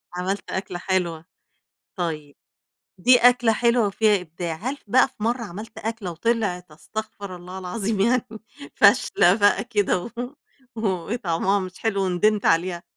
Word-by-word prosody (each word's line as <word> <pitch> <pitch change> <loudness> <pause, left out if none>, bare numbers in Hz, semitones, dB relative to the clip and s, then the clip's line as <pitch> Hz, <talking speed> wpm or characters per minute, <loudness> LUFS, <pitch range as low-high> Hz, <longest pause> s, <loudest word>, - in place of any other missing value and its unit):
عملت 190 +3 -3
أكلة 185 -2 -4
حلوة، 175 -4 -1 0.7
طيب 155 -5 -4 0.6
دي 250 +7 +6
أكلة 245 -1 +4
حلوة 235 -1 +2
وفيها 205 0 +2
إبداع 170 -1 -5
هل 255 - -4
بقى 250 +6 +5
في 260 -5 -11
مرّة 240 +2 0
عملت 215 +3 -9
أكلة 220 -5 -4
وطلعت 180 -2 -1
أستغفر 200 +4 -7
الله 180 +1 -9
العظيم 195 +3 -3
يعني 245 +3 +2 0.5
فاشلة 200 -4 +5
بقى 205 -1 +3
كده 205 -6 0
و - - -7 0.7
و 220 -1 -1 0.3
وطعمها 195 -2 0
مش 185 -1 -7
حلو 210 -3 0
وندمت 195 +3 +1
عليها؟ 170 +1 +1
200 Hz, 140 wpm, -23 LUFS, 180-225 Hz, 0.7 s, دي